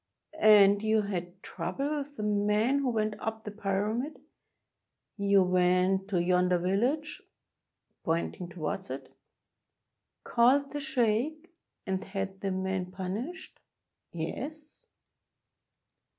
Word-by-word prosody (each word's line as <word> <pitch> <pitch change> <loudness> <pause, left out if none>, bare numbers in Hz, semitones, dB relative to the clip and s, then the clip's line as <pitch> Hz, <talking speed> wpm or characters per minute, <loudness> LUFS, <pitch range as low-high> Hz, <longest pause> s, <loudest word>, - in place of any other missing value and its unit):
"And 205 -3 +7
you 220 0 +2
had 185 -2 -5
trouble 270 - -3
with 285 0 -8
the 215 - -3
men 210 +5 +2
who 275 -2 0
went 215 -2 0
up 220 0 -4
the 210 - -6
Pyramid? 210 +7 -2 1.0
You 200 -1 +4
went 185 +1 +2
to 195 -4 0
yonder 180 +1 +3
village 240 - 0 0.8
[pointing 170 +2 -2
towards 170 -6 -4
it], 130 +1 -7 1.1
called 270 +4 +3
the 290 - -4
sheikh, 300 - 0 0.3
and 190 0 -2
had 195 0 -5
the 195 - -1
men 190 -1 -2
punished?" 200 - -6 0.5
"Yes." 295 - -6
205 Hz, 110 wpm, -29 LUFS, 185-250 Hz, 1.1 s, And